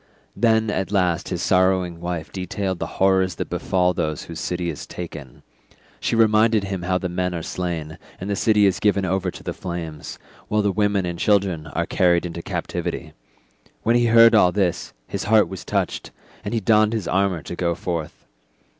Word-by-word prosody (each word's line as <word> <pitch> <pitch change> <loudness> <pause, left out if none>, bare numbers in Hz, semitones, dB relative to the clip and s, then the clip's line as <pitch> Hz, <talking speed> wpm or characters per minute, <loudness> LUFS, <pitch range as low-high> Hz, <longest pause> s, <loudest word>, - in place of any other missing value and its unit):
Then 110 -2 +2
at 95 0 -2
last 90 -5 +1
his 90 0 -3
sorrowing 90 -2 +2
wife 85 -2 -4
detailed 95 0 -3
the - - -3
horrors 95 -2 +3
that - - -5
befall 90 -1 +1
those 75 -3 -2
whose 85 -1 -8
city 90 -1 -2
is 75 - -8
taken; 80 -7 -9 0.6
she - - -1
reminded 110 -1 +4
him 95 -2 -4
how 90 +1 0
the 90 - -3
men 90 0 -2
are 85 - -4
slain, 85 -3 -4 0.2
and 95 - -5
the 100 - -1
city 105 0 +3
is 95 -2 +2
given 100 -2 +2
over 95 0 0
to - - -10
the - - -4
flames, 85 -4 -6 0.3
while 105 0 +1
the 100 - +2
women 100 -2 +1
and 85 -1 -4
children 95 -6 +1
are 70 - -2
carried 90 -1 +2
into 85 -1 -5
captivity; - - -4 0.7
when 115 +2 +3
he 120 0 +3
heard 115 0 +7
all 90 -5 +5
this, 95 -3 -1
his - - -4
heart 105 0 +4
was 95 - -7
touched, - - -2 0.3
and - - -3
he - - +2
donned 110 +1 +3
his 110 -6 -2
armour 95 -3 0
to - - -6
go 85 -1 0
forth. 85 -2 -5
95 Hz, 190 wpm, -22 LUFS, 85-105 Hz, 0.7 s, heard